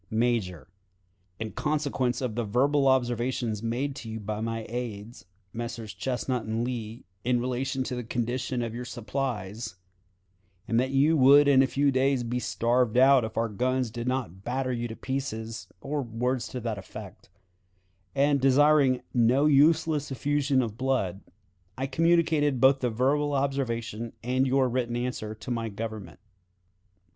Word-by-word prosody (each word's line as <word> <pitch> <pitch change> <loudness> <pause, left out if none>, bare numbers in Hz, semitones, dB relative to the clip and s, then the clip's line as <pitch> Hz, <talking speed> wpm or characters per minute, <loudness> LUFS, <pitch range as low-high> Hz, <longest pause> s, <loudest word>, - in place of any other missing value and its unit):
"Major: 110 -7 -1 0.7
In 110 -1 -5
consequence 145 -5 -1
of 125 -4 -2
the 120 +2 -1
verbal 135 +6 +2
observations 120 -3 0
made 125 +5 -2
by - - -8
you 110 0 -5
to 105 0 -4
my 115 0 -3
aides, 115 -2 -6 0.3
Messrs. 115 -3 -5
Chesnut 125 +4 -2
and 110 +2 -1
Lee, 120 -2 -5 0.2
in 125 0 +2
relation 130 +2 -2
to 125 - -4
the 125 - -4
condition 120 +2 -2
of 115 -1 -4
your 120 +1 -5
supplies, 120 -4 -4 0.9
and 115 - +2
that 130 +1 +1
you 140 +4 +3
would 140 +2 +7
in 135 -2 +6
a 135 - +3
few 140 +1 +2
days 130 -1 +2
be 120 +1 -2
starved 120 0 +1
out 130 0 +6
if 110 0 -6
our 115 - +2
guns 125 +3 -1
did 120 +1 -5
not 120 -8 -3
batter 130 +2 -1
you 120 -1 -2
to 110 - -7
pieces 115 -5 -4
or 145 +1 -2
words 125 +1 -2
to 125 - -5
that 110 -3 -3
effect 95 - -11 0.9
and 140 0 +3
desiring 135 -1 +4
no 125 +4 +3
useless 150 0 +3
effusion 140 0 +1
of 110 0 -6
blood, 125 -8 0 0.6
I 130 - -1
communicated 155 -1 +2
both 135 +2 +5
the 125 - 0
verbal 140 +6 +1
observation 120 -5 -2
and 130 +2 +1
your 130 0 +3
written 120 -1 -1
answer 120 -3 -3
to 110 +3 -7
my 115 -1 -2
Government. 105 -4 -7
125 Hz, 155 wpm, -27 LUFS, 115-135 Hz, 0.9 s, would